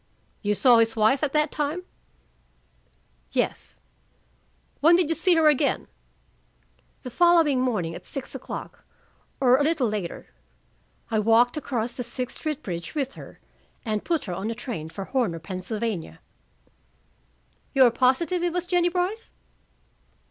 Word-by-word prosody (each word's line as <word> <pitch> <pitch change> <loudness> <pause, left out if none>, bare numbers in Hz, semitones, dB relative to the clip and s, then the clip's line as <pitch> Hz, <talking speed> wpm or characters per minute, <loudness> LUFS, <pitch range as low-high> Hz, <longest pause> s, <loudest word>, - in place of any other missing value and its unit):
"You 210 -1 0
saw 240 +1 +6
his 225 0 +2
wife 220 +5 +3
at 300 -3 0
that 300 -1 +2
time?" 300 +4 -2 1.5
"Yes." - - -2 1.0
"When 330 +4 +6
did 345 -3 +2
you - - +2
see 345 +3 +2
her 320 -1 +4
again?" 295 -1 +2 1.2
"The 250 - -7
following 330 -4 +4
morning, 205 -10 -1
at - - -9
six 275 - -6
o'clock, - - -8 0.6
or 255 -1 +5
a - - +2
little 300 -5 +1
later. 205 -5 -5 0.8
I 220 - +2
walked 230 +3 +4
across 245 -6 -2
the 250 - -4
Sixth 250 +1 -5
Street 305 -3 -4
bridge 170 - -6
with 275 -3 -2
her, - - -12 0.5
and 215 -2 -2
put 335 -3 -1
her 180 - -4
on 190 +5 -3
a 230 - -3
train 190 - -6
for 195 +3 -7
Horner, 230 -11 -1
Pennsylvania." 185 - -4 1.6
"You 270 - +7
are 240 - +5
positive 265 +9 +1
it 350 -1 0
was 360 0 -1
Jennie 350 -1 +2
Brice?" 370 +5 -3
255 Hz, 145 wpm, -25 LUFS, 215-315 Hz, 1.6 s, You